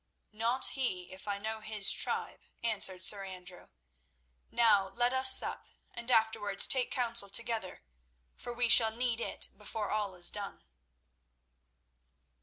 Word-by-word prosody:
"Not 230 +4 +1
he, 185 -10 -5
if 190 +2 -13
I 200 -1 -4
know 220 +2 -6
his 215 -2 +3
tribe," - - -4 0.2
answered 195 -5 -1
Sir 200 0 +3
Andrew. 185 -1 -12 0.8
"Now 220 -5 +2
let 240 +5 -1
us 260 0 +5
sup - - +5 0.3
and 235 +1 -7
afterwards 220 -4 +2
take 255 -2 +1
counsel 235 -5 -2
together, 225 - -5 0.5
for 240 - -10
we 240 0 -1
shall 230 -1 +6
need 235 -1 -3
it - - -4
before 210 0 -7
all 205 -3 -4
is 175 -1 +3
done." 205 -1 -8
220 Hz, 135 wpm, -30 LUFS, 195-235 Hz, 0.8 s, shall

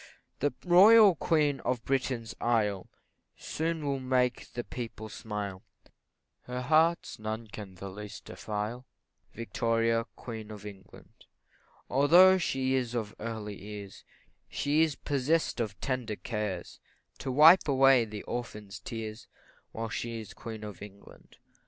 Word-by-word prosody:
The 145 +1 +1
Royal 200 +3 +8
Queen 150 -4 +1
of 125 -2 -2
Britain's 125 -4 -1
isle 105 -5 0 0.5
Soon 160 -1 -3
will 140 -1 -1
make 130 -1 0
the 120 - -3
people 115 -3 -7
smile, 105 -3 -5 0.8
Her 125 0 -4
heart 160 +5 +2
none 110 +1 -4
can 100 -3 -9
the 100 +2 -8
least 105 +2 -9
defile, 110 +4 -5 0.5
Victoria, 115 0 0
Queen 110 -3 -8
of 105 -1 -9
England; 95 -2 -13 0.6
Although 175 +8 +6
she 130 -5 0
is 125 -2 -1
of 110 -3 -3
early 105 -3 -5
years, 100 -1 -9 0.5
She 150 +2 +1
is 160 -3 +2
possess'd 145 +2 0
of 105 -4 -4
tender 125 -5 -2
cares, 105 -6 -4 0.4
To 135 - -3
wipe 155 +8 +7
away 135 -3 +5
the 105 -2 -7
orphan's 105 -4 -6
tears, 110 -1 -7 0.4
While 115 0 -4
she 115 +1 -4
is 110 - -9
Queen 110 -2 -8
of 105 -3 -8
England. 100 -1 -14
115 Hz, 130 wpm, -30 LUFS, 105-135 Hz, 0.8 s, Royal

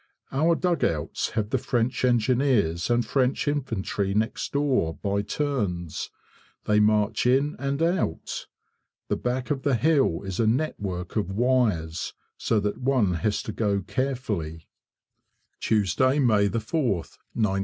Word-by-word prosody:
Our 160 +5 +3
dugouts 160 - 0
have 105 -1 0
the 130 - +2
French 125 0 -1
Engineers 120 - +2
and 120 0 +2
French 135 +1 0
Infantry 110 -8 -1
next 110 +2 -1
door 135 - +1
by 100 0 -1
turns. 100 - -2 0.6
They 105 0 +3
march 105 +2 +2
in 135 +4 +2
and 140 +3 -1
out. 170 - -1 0.6
The - - +2
back 125 +3 -2
of 135 -2 -1
the 140 -2 +2
hill 135 - +2
is 95 -2 -5
a 115 - +3
network 105 - -2
of 100 -4 0
wires, 105 -8 +1 0.2
so 110 - +1
that 105 0 -2
one 125 -8 +2
has 105 +2 0
to - - -4
go 100 -2 0
carefully. 105 - -3 0.9
Tuesday, 115 +6 +2
May 110 -7 +3
4th, 110 - -2 0.2
1915. 100 -4 +1
115 Hz, 135 wpm, -26 LUFS, 100-135 Hz, 0.9 s, Our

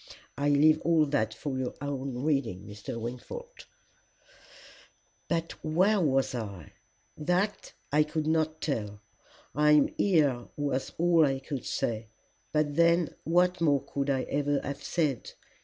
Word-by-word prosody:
I 145 +1 0
leave 155 +2 +5
all 165 -2 +3
that 140 -7 0
for 130 +4 -4
your 130 -1 -3
own 135 -2 -4
reading, 125 -11 0
Mr. 105 +3 -7
Wingfold. 470 - -8 1.6
"'But 165 -1 -1
where 185 +6 +3
was 135 -5 +1
I? 100 -9 -6 0.4
That 180 +7 -1 0.2
I 150 +1 +4
could 150 0 -1
not 155 0 0
tell. 105 -8 -3 0.5
I 150 +3 +4
am 150 -1 +5
here 145 -10 +2
was 140 -2 -2
all 170 -1 +4
I 135 -2 +2
could 135 0 -6
say; 110 -1 -2 0.4
but 150 -1 +1
then 170 0 +3
what 180 +2 +2
more 145 -4 +3
could 140 0 -2
I 135 -2 +1
ever 145 0 0
have 140 0 -5
said? 150 -8 -1
145 Hz, 140 wpm, -29 LUFS, 130-160 Hz, 1.6 s, leave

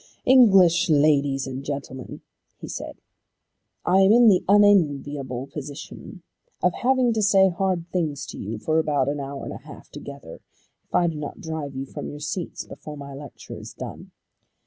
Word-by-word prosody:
"English 195 -10 +6
Ladies 145 -2 +3
and 135 0 -6
Gentlemen," 135 -3 -6 0.4
he - - -8
said, - - -7 0.9
"I 190 - +4
am 195 +1 +6
in 235 0 +7
the 185 -3 +3
unenviable 145 -10 +3
position 145 +5 -9 0.4
of 180 - +3
having 250 +1 +2
to 220 - 0
say 195 -2 +5
hard 185 -1 -1
things 150 -5 -2
to - - -9
you 110 +3 -5
for 155 +8 0
about 145 -4 +1
an 145 0 -2
hour 140 0 -6
and - - -6
a - - -7
half - - -12
together, 140 -11 -10 0.5
if - - -7
I 175 - +4
do 165 -2 -1
not 150 +7 -6
drive 160 -6 -5
you 135 +1 -4
from - - -7
your 145 - -8
seats 150 +4 -4
before 150 -1 -10
my 140 -1 -9
lecture 140 +1 -10
is - - -10
done. - - -8
150 Hz, 170 wpm, -24 LUFS, 140-190 Hz, 0.9 s, in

